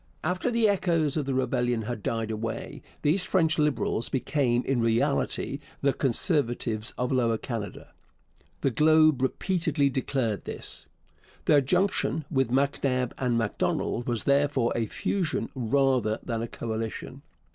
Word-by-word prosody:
After 180 Hz, +8 st, 0 dB
the 230 Hz, -2 st, +3 dB
echoes 170 Hz, -7 st, +1 dB
of 150 Hz, -3 st, -1 dB
the 135 Hz, -, 0 dB
rebellion 120 Hz, -2 st, 0 dB
had 115 Hz, 0 st, -4 dB
died 115 Hz, +1 st, -2 dB
away 110 Hz, +1 st, -5 dB, 0.2 s
these 165 Hz, +6 st, +3 dB
French 165 Hz, -5 st, +2 dB
Liberals 130 Hz, -5 st, +1 dB
became 130 Hz, -2 st, +1 dB
in 135 Hz, -3 st, 0 dB
reality 135 Hz, +4 st, 0 dB, 0.2 s
the 140 Hz, -1 st, +3 dB
Conservatives 120 Hz, -, 0 dB
of 125 Hz, +1 st, -1 dB
Lower 120 Hz, -3 st, +2 dB
Canada. 110 Hz, -4 st, -6 dB, 0.7 s
The 135 Hz, -, +2 dB
Globe 155 Hz, +1 st, +4 dB
repeatedly 155 Hz, 0 st, +1 dB
declared 130 Hz, -6 st, -1 dB
this. -, -, -6 dB, 0.6 s
Their 150 Hz, -2 st, +5 dB
junction 180 Hz, 0 st, +1 dB
with 135 Hz, -5 st, +1 dB
MacNab 130 Hz, -1 st, +1 dB
and 125 Hz, -3 st, +1 dB
Macdonald 115 Hz, +1 st, -1 dB
was 120 Hz, -3 st, -1 dB
therefore 140 Hz, -3 st, +2 dB
a 115 Hz, -2 st, 0 dB
fusion 180 Hz, -, -1 dB
rather 130 Hz, -3 st, +1 dB
than 115 Hz, -2 st, -2 dB
a 115 Hz, -, -3 dB
coalition. 110 Hz, -1 st, -5 dB
130 Hz, 135 wpm, -27 LUFS, 115-150 Hz, 0.7 s, Their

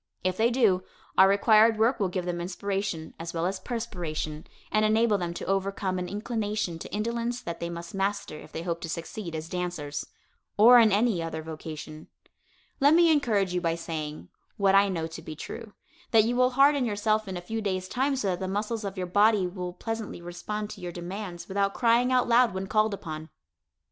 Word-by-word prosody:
If 185 Hz, 0 st, +1 dB
they 225 Hz, +3 st, +3 dB
do, 225 Hz, -7 st, +3 dB, 0.3 s
our 190 Hz, -, +7 dB
required 215 Hz, +2 st, +5 dB
work 230 Hz, +4 st, +2 dB
will 195 Hz, -3 st, +1 dB
give 180 Hz, -1 st, -3 dB
them 175 Hz, -1 st, -2 dB
inspiration, 190 Hz, -2 st, -3 dB
as 165 Hz, +1 st, -6 dB
well 165 Hz, +1 st, 0 dB
as 190 Hz, +1 st, -1 dB
perspiration, 175 Hz, -9 st, -4 dB, 0.2 s
and 215 Hz, -, +3 dB
enable 215 Hz, -1 st, +3 dB
them 175 Hz, -1 st, -2 dB
to -, -, -5 dB
overcome 195 Hz, -1 st, -1 dB
an 180 Hz, -, -4 dB
inclination 210 Hz, -4 st, -2 dB
to -, -, -8 dB
indolence 235 Hz, +3 st, -2 dB
that 170 Hz, -9 st, -6 dB
they 170 Hz, -, -3 dB
must 170 Hz, 0 st, -7 dB
master 195 Hz, -3 st, -2 dB
if -, -, -13 dB
they 165 Hz, -, -5 dB
hope 170 Hz, -1 st, -3 dB
to 165 Hz, -, -5 dB
succeed 170 Hz, +1 st, -5 dB
as 160 Hz, 0 st, -5 dB
dancers 170 Hz, -5 st, -4 dB, 0.5 s
or 240 Hz, +4 st, +9 dB
in 225 Hz, -2 st, +6 dB
any 205 Hz, -3 st, +2 dB
other 160 Hz, -1 st, -4 dB
vocation. 155 Hz, -1 st, -8 dB, 0.7 s
Let 285 Hz, +3 st, +6 dB
me 340 Hz, -1 st, +6 dB
encourage 215 Hz, -, +2 dB
you 180 Hz, -, 0 dB
by 165 Hz, -1 st, 0 dB
saying, 155 Hz, -3 st, -5 dB, 0.3 s
what 195 Hz, -1 st, +3 dB
I 200 Hz, 0 st, +5 dB
know 165 Hz, -4 st, -2 dB
to 165 Hz, 0 st, -8 dB
be 155 Hz, -1 st, -8 dB
true, 220 Hz, +7 st, -8 dB, 0.4 s
that 225 Hz, -3 st, +6 dB
you 235 Hz, +3 st, 0 dB
will 250 Hz, 0 st, +4 dB
harden 280 Hz, 0 st, +5 dB
yourself 215 Hz, -1 st, 0 dB
in 185 Hz, -1 st, -4 dB
a -, -, -5 dB
few 220 Hz, +5 st, -4 dB
days' 185 Hz, -3 st, -2 dB
time 270 Hz, +6 st, 0 dB
so 230 Hz, -7 st, -1 dB
that 180 Hz, -, -1 dB
the 190 Hz, -, -3 dB
muscles 210 Hz, +3 st, -2 dB
of 200 Hz, -1 st, -5 dB
your 185 Hz, -, -2 dB
body 205 Hz, +2 st, +4 dB
will 180 Hz, 0 st, -4 dB
pleasantly 225 Hz, +2 st, -5 dB
respond 195 Hz, +5 st, -5 dB
to 195 Hz, -, -9 dB
your 175 Hz, -1 st, -4 dB
demands 175 Hz, +1 st, -6 dB
without 200 Hz, 0 st, 0 dB
crying 240 Hz, +1 st, +3 dB
out 250 Hz, -1 st, +3 dB
loud 235 Hz, -3 st, +4 dB
when 190 Hz, 0 st, -2 dB
called 215 Hz, +1 st, +2 dB
upon. 155 Hz, -3 st, -7 dB
195 Hz, 205 wpm, -27 LUFS, 175-220 Hz, 0.7 s, or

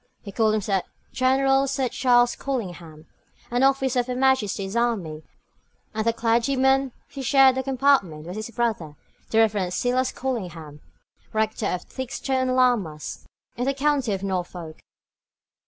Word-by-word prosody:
He 200 Hz, -, -8 dB
called 220 Hz, +1 st, +2 dB
himself 200 Hz, -3 st, 0 dB, 0.3 s
General 270 Hz, +1 st, +3 dB
Sir 270 Hz, -1 st, 0 dB
Charles 245 Hz, -1 st, +3 dB
Collingham, 175 Hz, -, -5 dB, 0.5 s
an 245 Hz, +1 st, +1 dB
officer 270 Hz, -1 st, +2 dB
of 245 Hz, -, -1 dB
her 250 Hz, -, -3 dB
Majesty's 230 Hz, -6 st, +1 dB
army; 200 Hz, -11 st, -1 dB, 0.7 s
and 220 Hz, 0 st, -1 dB
the -, -, +5 dB
clergyman 260 Hz, +4 st, +2 dB, 0.2 s
who 275 Hz, -, -5 dB
shared 270 Hz, 0 st, +5 dB
the 260 Hz, -, -1 dB
compartment 260 Hz, -, +1 dB
was 180 Hz, +2 st, -7 dB
his 215 Hz, +1 st, -5 dB
brother, 220 Hz, -10 st, -2 dB, 0.3 s
the 220 Hz, -, 0 dB
Reverend 205 Hz, -5 st, +2 dB
Silas 250 Hz, +1 st, +1 dB
Collingham, 175 Hz, -, -5 dB, 0.5 s
rector 220 Hz, 0 st, 0 dB
of 180 Hz, -, -2 dB
Theakstone 260 Hz, 0 st, -2 dB
Lammas, 215 Hz, -13 st, 0 dB, 0.3 s
in 245 Hz, -, -2 dB
the 275 Hz, 0 st, 0 dB
county 275 Hz, -4 st, +1 dB
of 195 Hz, 0 st, -4 dB
Norfolk. 175 Hz, -4 st, -4 dB
235 Hz, 140 wpm, -24 LUFS, 195-265 Hz, 0.7 s, the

